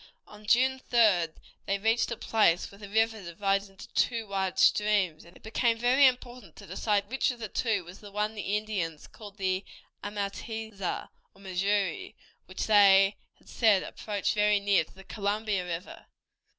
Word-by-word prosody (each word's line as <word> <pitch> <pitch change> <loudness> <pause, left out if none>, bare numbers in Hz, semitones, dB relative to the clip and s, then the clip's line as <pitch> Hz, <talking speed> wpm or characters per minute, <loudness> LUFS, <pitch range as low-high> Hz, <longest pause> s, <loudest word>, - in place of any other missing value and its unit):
On 210 0 -15
June 260 +3 +3
3d 195 -9 +4 0.3
they 200 - +1
reached 225 +4 +1
a 235 - -4
place 210 -7 +2
where 200 - -15
the 205 -1 -10
river 220 +1 +1
divided 195 +3 -1
into 195 0 -13
two 230 -2 0
wide 195 -2 -2
streams, 200 -7 +2
and 170 +1 -17
it - - -24
became 230 +1 +1
very 255 +4 +5
important 250 -1 -4
to 200 - -12
decide 200 +2 -1
which 265 +6 0
of 250 - -4
the 225 -2 -5
two 210 -2 -1
was 180 +3 -12
the 205 - -11
one 210 +1 -1
that 220 - -16
the 205 0 -1
Indians 190 -8 -4
called 205 -2 -13
the 190 -1 -1 0.4
Ahmateahza, 205 0 -4 0.3
or 195 - -19
Missouri, 200 - -1 0.3
which - - -4
they 200 -1 +6 0.2
had - - -27
said 215 -5 +3
approached 205 -2 -3
very 210 -1 +3
near 200 -4 +2
to 160 - -20
the 190 - -13
Columbia 205 0 -2
River. 175 0 -7
205 Hz, 175 wpm, -28 LUFS, 195-220 Hz, 0.4 s, they